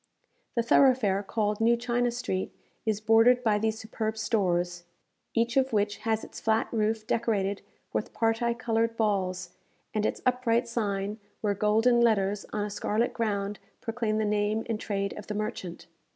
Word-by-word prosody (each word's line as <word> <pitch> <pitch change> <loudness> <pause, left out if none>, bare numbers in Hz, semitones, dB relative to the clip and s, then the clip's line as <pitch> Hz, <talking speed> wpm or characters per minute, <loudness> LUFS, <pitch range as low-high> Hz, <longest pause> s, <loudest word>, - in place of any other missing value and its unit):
The 235 - +2
thoroughfare 235 -5 +4
called 210 +1 -1
New 235 +1 +4
China 245 0 0
Street 235 -6 -3 0.4
is 215 -2 +1
bordered 225 +3 +5
by 210 -3 +3
these 220 0 0
superb 220 0 -3
stores, 180 -5 0 0.5
each 235 +2 +1
of 265 -2 +2
which 205 0 +1
has 220 0 -1
its - - -9
flat 220 0 +1
roof 220 -1 0
decorated 205 -4 0 0.3
with - - -2
parti 230 +1 +1
coloured 230 -1 0
balls, 185 -5 0 0.4
and 215 - 0
its - - -2
upright 250 -1 +2
sign, 210 -2 -2 0.2
where 205 -2 +1
golden 225 +4 +3
letters 205 -3 +2
on 210 - -1
a - - -4
scarlet 210 +3 0
ground 205 -3 -2 0.2
proclaim 225 -2 -1
the 220 - +1
name 210 +1 0
and 225 -2 -2
trade 200 -2 -2
of 210 - -10
the 210 - -4
merchant. 210 -5 -4
220 Hz, 160 wpm, -28 LUFS, 205-230 Hz, 0.5 s, bordered